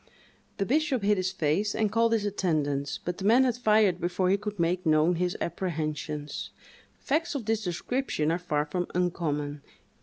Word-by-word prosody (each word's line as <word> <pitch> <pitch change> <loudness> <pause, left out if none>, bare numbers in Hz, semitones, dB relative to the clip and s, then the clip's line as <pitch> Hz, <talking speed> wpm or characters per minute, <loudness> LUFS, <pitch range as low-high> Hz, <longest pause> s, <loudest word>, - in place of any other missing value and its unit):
The 195 - 0
bishop 275 - +1
hid 205 0 +3
his 185 0 0
face, 165 +7 0
and 215 -2 +1
called 230 +1 +3
his 215 -2 +1
attendants, 150 -8 -1
but 175 +1 -3
the - - -5
man 230 +6 +5
had 250 -2 +1
fired 215 -6 +3
before 180 +1 +1
he 200 - +4
could 210 -1 -6
make 175 +2 +1
known 160 +1 +3
his 180 +1 -1
apprehensions. 155 -4 -3 0.5
Facts 315 +3 -1
of 255 -6 -3
this 220 0 0
description 175 - -1
are 170 - 0
far 150 -4 -1
from 175 +4 -2
uncommon. 150 -5 -1
180 Hz, 175 wpm, -28 LUFS, 160-215 Hz, 0.5 s, man